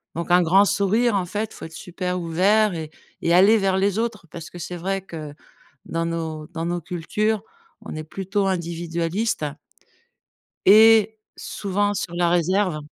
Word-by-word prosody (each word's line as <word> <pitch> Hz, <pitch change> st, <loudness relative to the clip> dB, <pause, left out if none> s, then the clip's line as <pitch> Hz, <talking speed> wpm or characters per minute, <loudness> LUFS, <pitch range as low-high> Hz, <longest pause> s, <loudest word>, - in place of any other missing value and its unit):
Donc 170 Hz, +1 st, -4 dB
un 180 Hz, +1 st, +6 dB
grand 180 Hz, +4 st, +5 dB
sourire, 210 Hz, +4 st, +2 dB
en 190 Hz, -2 st, 0 dB
fait, 210 Hz, +4 st, -3 dB
il -, -, -13 dB
faut -, -, -9 dB
être 160 Hz, -, -11 dB
super 180 Hz, +2 st, -4 dB
ouvert 195 Hz, +5 st, +2 dB
et 160 Hz, -2 st, -5 dB, 0.3 s
et 170 Hz, -, +1 dB
aller 195 Hz, +5 st, +6 dB
vers 195 Hz, -2 st, +1 dB
les 200 Hz, +2 st, +1 dB
autres. 230 Hz, -6 st, -3 dB
Parce 165 Hz, -2 st, -8 dB
que 175 Hz, -, -11 dB
c'est 175 Hz, +1 st, -6 dB
vrai 195 Hz, +3 st, -2 dB
que 160 Hz, -5 st, -8 dB, 0.5 s
dans 165 Hz, 0 st, -2 dB
nos 160 Hz, -2 st, -4 dB
dans 165 Hz, -1 st, -5 dB
nos 175 Hz, +1 st, -1 dB
cultures, 200 Hz, +6 st, -2 dB, 0.4 s
on -, -, -8 dB
est 155 Hz, -, -5 dB
plutôt 195 Hz, +4 st, -2 dB
individualiste 170 Hz, +1 st, -2 dB, 1.2 s
et 220 Hz, +1 st, +6 dB, 0.2 s
souvent 205 Hz, +1 st, -2 dB
sur 175 Hz, -, -4 dB
la 175 Hz, 0 st, +2 dB
réserve. 175 Hz, 0 st, +1 dB
180 Hz, 165 wpm, -23 LUFS, 170-205 Hz, 1.2 s, un